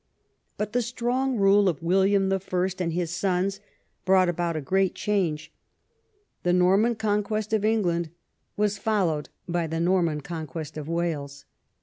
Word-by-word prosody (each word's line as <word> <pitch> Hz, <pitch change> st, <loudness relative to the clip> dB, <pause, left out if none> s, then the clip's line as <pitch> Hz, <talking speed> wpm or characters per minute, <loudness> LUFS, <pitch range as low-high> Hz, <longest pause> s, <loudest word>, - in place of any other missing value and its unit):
But 210 Hz, 0 st, -3 dB
the 245 Hz, -, +2 dB
strong 250 Hz, +2 st, -1 dB
rule 200 Hz, 0 st, +5 dB
of 165 Hz, -1 st, -4 dB
William 195 Hz, +2 st, +3 dB
I. 185 Hz, -1 st, -1 dB
and 170 Hz, -2 st, -1 dB
his 170 Hz, 0 st, -2 dB
sons 190 Hz, +2 st, 0 dB, 0.4 s
brought 185 Hz, -1 st, +4 dB
about 175 Hz, -1 st, -1 dB
a -, -, -1 dB
great 190 Hz, +6 st, +1 dB
change. 180 Hz, -7 st, -1 dB, 0.9 s
The 175 Hz, -, +1 dB
Xorman 195 Hz, +6 st, +3 dB
Conquest 215 Hz, 0 st, -1 dB
of 215 Hz, -2 st, +2 dB
England 175 Hz, -7 st, +1 dB, 0.5 s
was 205 Hz, -1 st, 0 dB
followed 180 Hz, -10 st, 0 dB, 0.2 s
by 170 Hz, -1 st, -1 dB
the 165 Hz, +1 st, -3 dB
Norman 170 Hz, -3 st, +1 dB
Conquest 160 Hz, -1 st, -6 dB
of 155 Hz, -1 st, -6 dB
Wales. 145 Hz, -5 st, -3 dB
185 Hz, 140 wpm, -26 LUFS, 170-205 Hz, 0.9 s, rule